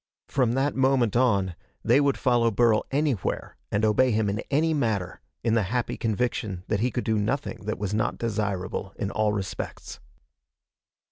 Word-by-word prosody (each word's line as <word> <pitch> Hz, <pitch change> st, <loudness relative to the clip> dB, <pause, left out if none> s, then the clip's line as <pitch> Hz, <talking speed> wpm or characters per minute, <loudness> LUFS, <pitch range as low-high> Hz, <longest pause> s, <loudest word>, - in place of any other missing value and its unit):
From 125 Hz, -4 st, +1 dB
that 135 Hz, +2 st, +1 dB
moment 130 Hz, -4 st, +2 dB
on, 100 Hz, -8 st, +2 dB, 0.3 s
they 140 Hz, -, +4 dB
would 140 Hz, -1 st, +2 dB
follow 120 Hz, -2 st, +3 dB
Burl 115 Hz, 0 st, +3 dB
anywhere 140 Hz, -8 st, -1 dB, 0.2 s
and 105 Hz, +1 st, +2 dB
obey 110 Hz, +5 st, +4 dB
him 110 Hz, -2 st, +1 dB
in 105 Hz, -, -3 dB
any 160 Hz, +3 st, +2 dB
matter, 110 Hz, -, -1 dB, 0.2 s
in 115 Hz, -1 st, +2 dB
the 115 Hz, -, +3 dB
happy 125 Hz, +1 st, -1 dB
conviction 110 Hz, -4 st, -2 dB
that 105 Hz, -, +1 dB
he 120 Hz, +4 st, +2 dB
could 120 Hz, +1 st, -3 dB
do 110 Hz, -2 st, +1 dB
nothing 110 Hz, 0 st, -2 dB
that 110 Hz, -, -2 dB
was 105 Hz, 0 st, -3 dB
not 110 Hz, +2 st, 0 dB
desirable 100 Hz, -4 st, -2 dB
in 100 Hz, -, -2 dB
all 110 Hz, -1 st, +1 dB
respects. 100 Hz, -3 st, -5 dB
110 Hz, 165 wpm, -26 LUFS, 105-125 Hz, 0.3 s, they